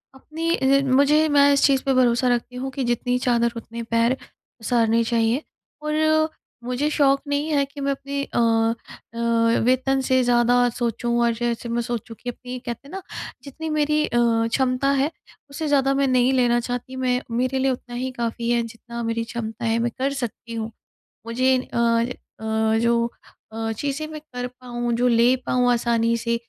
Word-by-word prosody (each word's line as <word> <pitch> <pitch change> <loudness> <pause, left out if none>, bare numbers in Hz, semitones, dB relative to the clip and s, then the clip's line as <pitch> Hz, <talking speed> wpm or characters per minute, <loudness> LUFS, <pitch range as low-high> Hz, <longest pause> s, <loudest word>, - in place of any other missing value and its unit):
अपनी 325 +5 -3
अ, 275 +1 +3
मुझे 300 +3 +4
मैं 285 0 +5
इस 280 - +2
चीज़ 270 -2 +3
पे 270 - +2
भरोसा 250 -1 +3
रखती 250 +1 -6
हूँ 265 +1 -4
कि 270 0 -3
जितनी 245 +1 0
चादर 235 -2 +2
उतने 230 0 -7
पैर 230 +3 +1 0.4
पसारने 230 0 +2
चाहिए। 230 +4 +1 0.4
और 310 +1 +2 0.3
मुझे 250 +5 -1
शौक 275 -2 +3
नहीं 285 +2 -1
है 285 -1 +3
कि 280 +1 -10
मैं 275 0 0
अपनी 280 +1 -3
अ - - -5 0.8
अ, 230 0 +2
वेतन 260 +2 +2
से 260 0 +2
ज़्यादा 245 0 +3
सोचूँ 240 0 -1
और 235 - +2
जैसे 235 0 -3
मैं 235 +1 0
सोचूँ 230 -1 -5
कि 245 - -5
अपनी 250 +1 -7
कहते 240 +3 -6
हैं - - -13
ना 385 - -5 0.4
जितनी 315 +3 -6
मेरी 305 0 +1
अ, - - -8
क्षमता 240 +3 +1
है 295 +4 0 0.4
उससे 305 +2 -4
ज़्यादा 275 -1 +3
मैं 275 0 +2
नहीं 255 0 +3
लेना 240 -2 +3
चाहती 245 +1 -5
मैं 255 -1 0
मेरे 255 +3 0
लिए 265 0 +2
उतना 245 -1 -6
ही 255 +1 -3
काफ़ी 235 -1 -3
है 240 0 +3
जितना 235 +1 -7
मेरी 230 0 -1
क्षमता 225 -1 -5
है 225 0 +2
मैं 235 0 0
कर 270 +2 0
सकती 240 -3 -5
हूँ। 225 0 -4 0.5
मुझे 255 +3 +2 0.2
अ - - -2 0.6
अ, 220 0 +1
जो 235 0 +2 0.5
अ, 225 0 -3
चीज़ें 290 +3 -3
मैं 310 -1 -8
कर 250 -5 -6
पाऊँ, 240 -1 -4
जो 245 +2 +2
ले 240 +2 +4
पाऊँ 250 -1 +2
आसानी 235 -1 +1
से 235 0 -1
245 Hz, 180 wpm, -23 LUFS, 235-275 Hz, 0.8 s, मैं